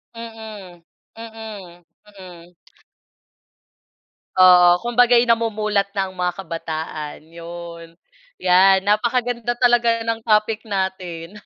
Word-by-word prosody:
Mm, 220 Hz, -6 st, -10 dB, 0.4 s
mm, 215 Hz, -6 st, -10 dB, 0.3 s
mm. 180 Hz, -2 st, -14 dB, 1.8 s
Oo, 180 Hz, 0 st, +6 dB
kumbaga 245 Hz, 0 st, +3 dB
yun 235 Hz, 0 st, +4 dB
namumulat 215 Hz, -3 st, 0 dB
na 190 Hz, -1 st, -2 dB
ang -, -, -17 dB
mga 180 Hz, 0 st, -1 dB
kabataan 160 Hz, -2 st, -6 dB
yun. 170 Hz, 0 st, -11 dB, 0.5 s
Yan 190 Hz, +1 st, +4 dB
napakaganda 235 Hz, +3 st, 0 dB
talaga 240 Hz, -2 st, +2 dB
ng 230 Hz, 0 st, -2 dB
topic 215 Hz, +1 st, +1 dB
natin. 190 Hz, -1 st, -5 dB
195 Hz, 95 wpm, -20 LUFS, 175-225 Hz, 1.8 s, Oo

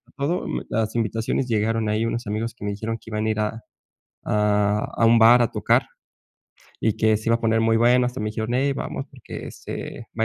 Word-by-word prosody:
todo 145 Hz, +6 st, -1 dB, 0.2 s
las 110 Hz, -1 st, -1 dB
invitaciones 115 Hz, +3 st, -1 dB
llegaron 110 Hz, -1 st, 0 dB
ahí 110 Hz, +2 st, 0 dB
unos 115 Hz, 0 st, -3 dB
amigos 110 Hz, +2 st, -2 dB
que 115 Hz, -, -9 dB
me 100 Hz, -, -1 dB
dijeron 110 Hz, +3 st, -4 dB
que 115 Hz, -, -14 dB
iban 110 Hz, 0 st, -1 dB
a -, -, +1 dB
ir 110 Hz, -, -3 dB
a 105 Hz, +2 st, -2 dB, 0.6 s
a 105 Hz, -1 st, +2 dB, 0.2 s
a 115 Hz, -, +4 dB
un 115 Hz, 0 st, +6 dB
bar 120 Hz, +2 st, +7 dB
a 120 Hz, -, +1 dB
tocar -, -, +2 dB, 1.0 s
y 110 Hz, -2 st, +1 dB
que 110 Hz, -1 st, +3 dB
se 110 Hz, +2 st, -4 dB
iba 115 Hz, -, +5 dB
a -, -, -3 dB
poner 115 Hz, -1 st, +2 dB
muy 115 Hz, 0 st, +3 dB
bueno 125 Hz, +2 st, +4 dB
hasta 125 Hz, +1 st, -4 dB
me 105 Hz, -, -2 dB
dijeron: 110 Hz, +2 st, -3 dB
"Ey 135 Hz, +2 st, +1 dB
vamos, -, -, -4 dB
porque, -, -, -9 dB
este, 115 Hz, -, -7 dB
va -, -, +3 dB
115 Hz, 215 wpm, -23 LUFS, 110-115 Hz, 1.0 s, bar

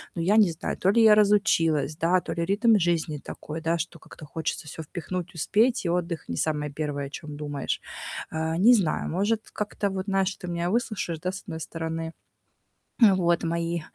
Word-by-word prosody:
Но 170 Hz, -, -2 dB
я 200 Hz, +6 st, +3 dB
не 200 Hz, -6 st, +6 dB
знаю, 160 Hz, -, -4 dB
то 190 Hz, -, +2 dB
ли 230 Hz, +2 st, +4 dB
я 215 Hz, -1 st, +8 dB
разучилась, 170 Hz, -8 st, +3 dB
да, 175 Hz, +3 st, +3 dB
то -, -, -6 dB
ли 170 Hz, 0 st, -1 dB
ритм 215 Hz, +4 st, +4 dB
жизни 165 Hz, -3 st, 0 dB
такой, 155 Hz, +3 st, -7 dB
да, 165 Hz, +1 st, +1 dB
что 165 Hz, 0 st, -5 dB
как-то 155 Hz, -, -13 dB
хочется 155 Hz, 0 st, -4 dB
всё 160 Hz, -, -7 dB
впихнуть, 175 Hz, +2 st, -5 dB
успеть, 220 Hz, -, +2 dB
и -, -, +1 dB
отдых 170 Hz, -1 st, -2 dB
не 85 Hz, -, -3 dB
самое 150 Hz, -2 st, -1 dB
первое 145 Hz, -1 st, -3 dB
о -, -, -11 dB
чём 150 Hz, 0 st, -8 dB
думаешь. 145 Hz, -2 st, -3 dB, 0.5 s
А, 160 Hz, +1 st, -1 dB
не 230 Hz, +7 st, +7 dB
знаю, 190 Hz, -9 st, +1 dB
может, 210 Hz, +6 st, 0 dB
как-то, 210 Hz, -1 st, -2 dB
вот, 190 Hz, -1 st, -3 dB
знаешь, 195 Hz, 0 st, +1 dB
ты 180 Hz, -, -8 dB
меня 175 Hz, 0 st, -1 dB
выслушаешь, 215 Hz, -8 st, -1 dB
да, 180 Hz, +3 st, -2 dB
с 190 Hz, -, -7 dB
одной 160 Hz, -5 st, -6 dB
стороны. 165 Hz, 0 st, -4 dB, 0.9 s
Э, 205 Hz, -3 st, +8 dB
вот, 175 Hz, -1 st, +2 dB
мои 170 Hz, 0 st, -1 dB
170 Hz, 200 wpm, -26 LUFS, 160-195 Hz, 0.9 s, я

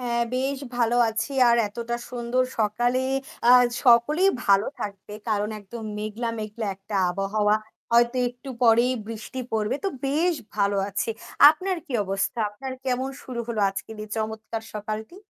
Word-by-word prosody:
হ্যাঁ 235 Hz, -1 st, 0 dB
বেশ 265 Hz, +2 st, -1 dB, 0.2 s
ভালো 240 Hz, 0 st, +2 dB
আছি 225 Hz, +4 st, -2 dB, 0.2 s
আর 235 Hz, -, +5 dB
এতটা 235 Hz, +2 st, -4 dB
সুন্দর 245 Hz, +1 st, 0 dB, 0.2 s
সকালে 240 Hz, +4 st, +1 dB, 0.5 s
আ -, -, +7 dB, 0.3 s
সকলেই 295 Hz, +11 st, +5 dB
ভালো 200 Hz, +1 st, +4 dB
থাকবে 200 Hz, 0 st, -6 dB
কারণ 210 Hz, -1 st, +1 dB
একদম 220 Hz, +3 st, -9 dB
মেঘলা, 215 Hz, +3 st, -3 dB
মেঘলা 215 Hz, +1 st, -4 dB
একটা 200 Hz, +2 st, -9 dB, 0.2 s
আবহাওয়া 205 Hz, +3 st, +1 dB, 0.4 s
হয়তো 235 Hz, +1 st, +4 dB
একটু 245 Hz, +2 st, -12 dB
পরেই 235 Hz, +2 st, +5 dB
বৃষ্টি 225 Hz, +3 st, -7 dB
পড়বে 215 Hz, +3 st, 0 dB
তো 390 Hz, -, +2 dB, 0.2 s
বেশ 330 Hz, +6 st, +2 dB, 0.2 s
ভালো 200 Hz, -1 st, +1 dB
আছি। 200 Hz, +3 st, -2 dB, 0.4 s
আপনার 370 Hz, +4 st, -2 dB
কি 275 Hz, -, -8 dB
অবস্থা 195 Hz, +5 st, -2 dB
আপনার 260 Hz, +6 st, -7 dB
কেমন 260 Hz, +1 st, 0 dB
শুরু 245 Hz, -2 st, -5 dB
হল 230 Hz, -2 st, -3 dB
আজকে 195 Hz, -, -7 dB
দিয়ে 215 Hz, 0 st, -8 dB
চমৎকার 220 Hz, 0 st, -4 dB
সকালটি? 215 Hz, -, -5 dB
230 Hz, 150 wpm, -25 LUFS, 210-250 Hz, 0.5 s, আ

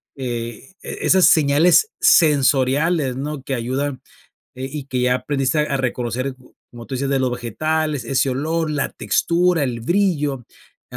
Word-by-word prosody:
eh, 120 Hz, -, -6 dB
e -, -, -9 dB
e -, -, -1 dB
esas 190 Hz, -1 st, +5 dB
señales 160 Hz, -, +4 dB
sensoriales, 145 Hz, 0 st, +3 dB
¿no?, 140 Hz, 0 st, -5 dB
que 135 Hz, -, -4 dB
ayudan, 130 Hz, +3 st, -3 dB, 0.5 s
eh, 130 Hz, +1 st, -6 dB
y 150 Hz, -3 st, -6 dB
que 130 Hz, -2 st, -2 dB
ya 125 Hz, 0 st, +2 dB
aprendiste 135 Hz, +2 st, -1 dB
a 145 Hz, -2 st, -1 dB
reconocer, 130 Hz, 0 st, -3 dB, 0.4 s
como 120 Hz, -1 st, -11 dB
tú 135 Hz, -, -6 dB
dices, 135 Hz, +1 st, -2 dB
de 140 Hz, -, +1 dB
los 130 Hz, -, 0 dB
vegetales, 145 Hz, +4 st, -2 dB
ese 135 Hz, +2 st, 0 dB
olor, 155 Hz, +4 st, -1 dB
la 145 Hz, -1 st, -1 dB
textura, 175 Hz, -2 st, +1 dB
el 120 Hz, -3 st, -2 dB
brillo, 150 Hz, -, 0 dB, 0.5 s
a -, -, -8 dB
140 Hz, 160 wpm, -20 LUFS, 125-155 Hz, 0.5 s, esas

